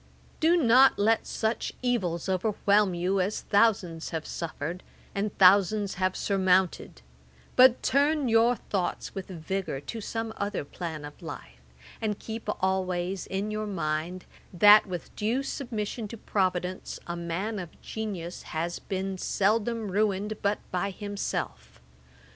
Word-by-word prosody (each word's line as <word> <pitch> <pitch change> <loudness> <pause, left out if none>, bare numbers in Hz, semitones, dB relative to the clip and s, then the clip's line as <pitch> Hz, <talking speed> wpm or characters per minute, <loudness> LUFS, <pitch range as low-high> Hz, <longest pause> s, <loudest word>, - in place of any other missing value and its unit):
'Do 335 +3 +4
not 260 -2 +6
let 220 +2 +2
such 220 +1 -2
evils 190 -10 0
overwhelm 200 0 +2
you 185 +3 0
as 195 +4 -1
thousands 195 -6 +2
have 160 -2 -4
suffered, 170 +1 -5 0.3
and 200 +1 -2
thousands 200 +2 +5
have 185 0 0
surmounted; 185 - +1 0.5
but 255 -1 +6
turn 285 +1 +2
your 230 +1 +4
thoughts 195 -4 -3
with 195 -2 -6
vigour 185 -3 -3
to 225 - -6
some 225 +1 -4
other 200 -6 -2
plan 160 -1 -6
of 145 - -11
life, - - -9 0.4
and 210 -2 -1
keep 220 -1 -6
always 185 -1 -1
in 200 +2 -2
your 215 0 -3
mind, 170 -1 -3 0.3
that, 205 +4 +7
with 180 -3 -6
due 230 +6 0
submission 230 -5 -4
to 230 - -8
Providence, 185 -3 -2
a 170 - -4
man 175 +6 -3
of 175 -3 -9
genius 190 -6 -5 0.2
has 170 +2 -2
been 190 0 -4
seldom 215 +2 0
ruined 210 +1 0
but 205 0 +1
by 185 +2 0
himself. 200 - -5
195 Hz, 135 wpm, -28 LUFS, 180-220 Hz, 0.5 s, that